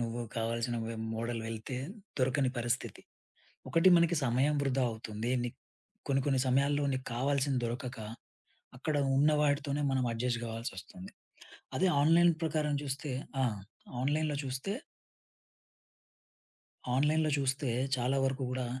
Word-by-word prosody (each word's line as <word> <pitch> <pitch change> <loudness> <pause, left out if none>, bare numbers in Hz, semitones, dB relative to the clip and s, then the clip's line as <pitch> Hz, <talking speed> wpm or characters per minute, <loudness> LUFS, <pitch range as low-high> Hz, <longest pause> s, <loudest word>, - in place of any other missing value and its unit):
నువ్వు 120 0 -2 0.2
కావాల్సినవి 115 0 -1 0.2
మోడల్ 115 0 -2
వెళ్తే 115 +3 -5 0.4
దొరకని 130 +1 +2
పరిస్థితి. 120 +2 -2 0.7
ఒకటి 165 +3 +4
మనకి 170 0 +3
సమయం 130 +5 +2
వృధా 135 -1 +1
అవుతుంది. 110 +1 -4
నీకు 120 - -5 0.5
కొన్ని, 135 -1 +2
కొన్ని 135 -2 +3
సమయాల్లో 140 +3 +3
నీకు 130 0 -3
కావాల్సింది 135 0 +1
దొరకక 120 +1 -4 0.8
అక్కడ 150 +4 -1 0.2
ఉన్న 150 +2 +5
వాటితోనే 145 0 +1
మనం 130 -1 +1
అడ్జస్ట్ 115 +1 -1
గావాల్సొస్తుంది. 95 -5 -6 0.7
అదే 190 - +3
ఆన్‌లైన్ 170 +3 +6
ప్రకారం 150 -2 0
చూస్తే 140 +1 -3 0.3
ఆ! - - +4 0.6
ఆన్‌లైన్‌లో 150 +2 +1
చూస్తే 130 +8 -3 2.3
ఆన్‌లైన్‌లో 155 +3 +3
చూస్తే 135 0 0 0.3
చాలా 125 +2 +1
వరుకు 135 0 0
గూడా 125 -1 -2
130 Hz, 115 wpm, -32 LUFS, 120-145 Hz, 2.3 s, ఆన్‌లైన్